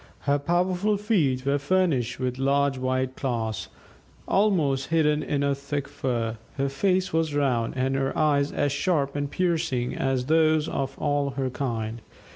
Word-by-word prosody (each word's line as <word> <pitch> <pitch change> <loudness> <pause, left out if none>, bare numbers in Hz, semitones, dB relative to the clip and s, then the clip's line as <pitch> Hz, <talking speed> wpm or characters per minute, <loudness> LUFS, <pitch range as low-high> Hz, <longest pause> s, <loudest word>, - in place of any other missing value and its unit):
Her 145 0 +1
powerful 180 +6 +1
feet 160 - +1
were 140 +1 +2
furnished 140 -7 +1
with 130 0 -2
large 140 +1 +2
white 130 0 -1
claws, 115 -4 -2 0.6
almost 165 -10 +2
hidden 155 -2 +2
in 145 -1 -1
her 140 0 +2
thick 140 0 -4
fur; 120 -5 -2 0.2
her 140 0 0
face 185 +5 0
was 160 -2 0
round, 125 -5 +1
and 130 +1 +1
her 135 0 -1
eyes 145 -2 +2
as 145 - 0
sharp 145 -2 0
and 145 -1 -2
piercing 160 -8 0
as 135 -2 0
those 155 0 +3
of 135 0 -3
all 145 -1 0
her 130 -2 -1
kind. 115 -4 -3
140 Hz, 155 wpm, -26 LUFS, 130-155 Hz, 0.6 s, those